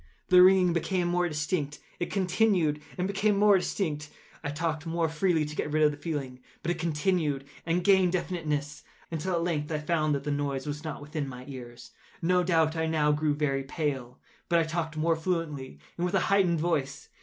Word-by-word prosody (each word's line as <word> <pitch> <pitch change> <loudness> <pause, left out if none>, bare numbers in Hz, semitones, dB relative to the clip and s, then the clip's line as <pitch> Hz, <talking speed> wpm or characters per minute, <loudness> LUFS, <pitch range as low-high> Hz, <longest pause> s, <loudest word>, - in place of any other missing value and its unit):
The 180 0 +8
ringing 185 -1 +6
became 175 +1 0
more 175 0 +1
distinct:—it 150 +2 -3
continued 180 -5 +2 0.2
and 180 - 0
became 200 +1 +1
more 205 0 +6
distinct: 150 -6 -2 0.3
I 145 - -2
talked 155 +1 -2
more 165 0 +1
freely 160 0 +1
to 150 +1 -7
get 150 - -2
rid 155 +1 +3
of 150 - +5
the 145 - -8
feeling: 140 -5 -4 0.2
but 170 - 0
it - - -3
continued 155 -3 0 0.2
and 170 +2 +1
gained 190 -2 +4
definiteness—until, 160 0 -3
at 165 - 0
length, 155 -3 -1
I 155 - 0
found 155 -1 +1
that 140 - -4
the 145 - -2
noise 140 -2 -2
was 150 +1 -4
not 155 -3 -5
within 150 -1 -4
my 125 -1 -9
ears. 120 -3 -9 0.3
No 180 +2 +2
doubt 165 -2 +2
I 160 0 0
now 155 -2 +2
grew 150 0 +1
very 135 -2 0
pale;—but 135 +2 -3
I 165 - +4
talked 160 -1 -3
more 165 +1 +2
fluently, 160 -5 -3 0.2
and 175 - +1
with 185 - -2
a - - +5
heightened 185 -4 +3
voice. 150 -3 -1
160 Hz, 190 wpm, -28 LUFS, 150-175 Hz, 0.3 s, The